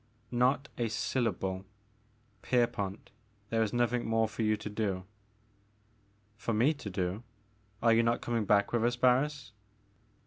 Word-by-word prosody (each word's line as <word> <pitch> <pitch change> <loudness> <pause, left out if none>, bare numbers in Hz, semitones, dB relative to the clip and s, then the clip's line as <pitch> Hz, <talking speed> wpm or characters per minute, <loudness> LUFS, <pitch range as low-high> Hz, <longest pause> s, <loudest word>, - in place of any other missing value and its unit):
Not 130 +4 +2
a 120 - +1
syllable. 95 -5 -1 0.8
Pierpont, 110 -6 -1 0.4
there 115 0 +2
is 110 -2 +1
nothing 120 0 +1
more 115 0 +2
for 110 - -6
you 110 -1 +2
to 105 - -7
do.*' 105 -3 -2 1.3
For 115 -1 -2
me 125 +9 +4
to 140 -8 -7
do? 90 +2 -2 0.6
Are 115 -1 +6
you 115 - +5
not 115 0 +1
coming 115 -3 -1
back 100 +2 +3
with 120 -1 +2
us, 120 +1 +2
Barris?" 130 +1 +2
115 Hz, 140 wpm, -31 LUFS, 105-120 Hz, 1.3 s, Are